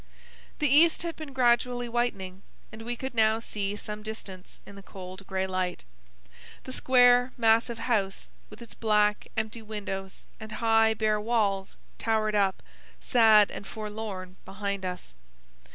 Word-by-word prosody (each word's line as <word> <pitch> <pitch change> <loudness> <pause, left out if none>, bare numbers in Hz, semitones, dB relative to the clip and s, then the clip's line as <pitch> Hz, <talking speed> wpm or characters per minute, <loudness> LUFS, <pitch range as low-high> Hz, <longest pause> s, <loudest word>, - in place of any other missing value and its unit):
The 300 - +1
east 315 +5 +5
had 335 -1 -4
been 310 -3 -8
gradually 245 -1 +2
whitening, 200 -6 -2 0.3
and 220 - -10
we 240 +2 -3
could 265 +2 -6
now 220 -1 +3
see 205 -3 -4
some 210 0 -6
distance 205 -4 -9
in - - -12
the 200 - -10
cold 185 0 -10
grey 190 -1 -1
light. 185 - -3 0.8
The 260 - -8
square, 245 -1 +4
massive 230 0 +3
house, 220 -5 -1 0.2
with 215 +3 -11
its 230 - -10
black, 210 -2 +1
empty 220 +1 -2
windows 200 -3 -6
and 220 -1 -9
high, 225 -1 +3
bare 215 -1 +1
walls, 205 -4 0 0.2
towered 220 -1 0
up, 195 -2 +1 0.4
sad 220 -4 +5
and 200 - -8
forlorn, 210 -4 -6
behind 200 -1 -4
us. 180 - -6
215 Hz, 145 wpm, -28 LUFS, 195-235 Hz, 0.8 s, east